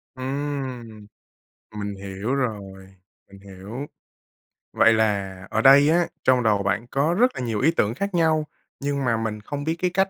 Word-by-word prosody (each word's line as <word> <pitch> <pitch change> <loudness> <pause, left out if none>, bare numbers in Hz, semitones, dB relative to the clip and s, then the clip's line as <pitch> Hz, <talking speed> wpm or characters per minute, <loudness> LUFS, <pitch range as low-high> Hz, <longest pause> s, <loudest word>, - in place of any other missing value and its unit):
Ừm, 130 -5 -5 0.7
mình 100 -1 -4
hiểu 100 +5 -4
rồi, 100 -7 -5 0.4
mình 100 - -14
hiểu. 100 +7 -8 0.9
Vậy 115 - +5
là 100 -4 0
ở 110 - 0
đây 140 +3 +7
á, 170 +1 +3 0.2
trong 125 -2 +3
đầu 105 -3 +2
bạn 105 +4 -1
có 140 +6 +1
rất 250 +7 +3
là - - -4
nhiều 115 -4 -2
ý 155 +5 +4
tưởng 110 -9 0
khác 200 +6 -3
nhau, 160 -3 +2 0.3
nhưng 140 -1 -2
mà 115 -2 +1
mình 110 -1 -3
không 145 +6 -5
biết 160 +2 -1
cái 180 - +2
cách 195 +1 +2
120 Hz, 170 wpm, -23 LUFS, 105-145 Hz, 0.9 s, đây